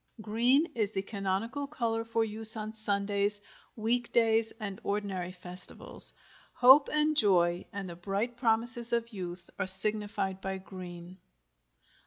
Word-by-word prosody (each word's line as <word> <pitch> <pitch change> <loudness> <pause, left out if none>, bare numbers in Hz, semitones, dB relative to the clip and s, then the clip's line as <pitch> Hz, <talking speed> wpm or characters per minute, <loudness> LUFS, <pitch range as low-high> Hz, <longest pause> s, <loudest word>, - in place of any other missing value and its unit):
GREEN 240 +8 +2
is 215 -4 0
the 195 -2 -3
canonical 205 +8 -3
color 230 -6 -2
for 230 0 0
use 220 +1 +7
on 215 0 -5
Sundays, 205 -1 -1 0.4
week 235 +2 -1
days, 225 -1 +2
and 200 -3 -6
ordinary 195 -3 -3
festivals. 180 0 0 0.4
Hope 265 +3 +7
and 305 0 +2
joy 175 - +3
and 200 -1 -6
the 170 - -8
bright 200 +7 -3
promises 235 0 0
of 235 0 -1
youth 180 -2 -7
are - - -1
signified 195 0 -1
by 190 0 -3
green. 180 -1 -10
210 Hz, 135 wpm, -30 LUFS, 190-230 Hz, 0.4 s, use